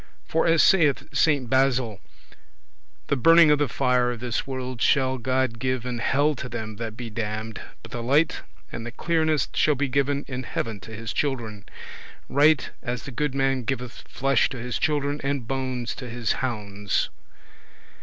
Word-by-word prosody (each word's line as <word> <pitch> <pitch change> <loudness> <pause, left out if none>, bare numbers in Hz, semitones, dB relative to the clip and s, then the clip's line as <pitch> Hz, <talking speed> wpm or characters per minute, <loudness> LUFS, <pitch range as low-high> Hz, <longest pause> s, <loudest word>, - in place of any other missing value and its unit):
For 165 - +1
as 165 -1 +5
saith 155 -7 +4
Saint 145 -3 +3
Basil, 130 -4 +1 1.0
"The - - +1
burning 165 +4 +7
of 150 - +4
the 145 - +2
fire 125 -2 +2
of 120 -1 -4
this 120 +1 -2
world 130 -2 -5
shall 130 -2 +2
God 130 -1 0
give 130 0 -1
in 125 -2 -3
hell 145 +5 +2
to 130 - -6
them 110 -3 -5
that 115 -1 -5
be 120 -2 -6
damned, 110 0 -4 0.2
but 115 - -11
the 120 -2 -4
light 145 +7 +2 0.3
and 115 - -5
the 120 - -6
clearness 160 +2 +1
shall 150 - +3
be 145 +2 0
given 140 +2 0
in 130 -2 -4
heaven 115 -4 -4
to 110 +3 -10
his 115 0 -5
children; 115 -8 -2 0.6
right 145 +2 +4
as 120 0 -4
the 140 - -7
good 135 +2 -2
man 135 -1 +1
giveth 125 0 -4
flesh 135 0 +2
to 135 - -6
his 125 +1 -3
children, 145 -1 0
and 140 -4 -2
bones 130 -2 -2
to 125 - -8
his 120 -2 -1
hounds." 105 -5 -2
130 Hz, 175 wpm, -25 LUFS, 115-140 Hz, 1.0 s, burning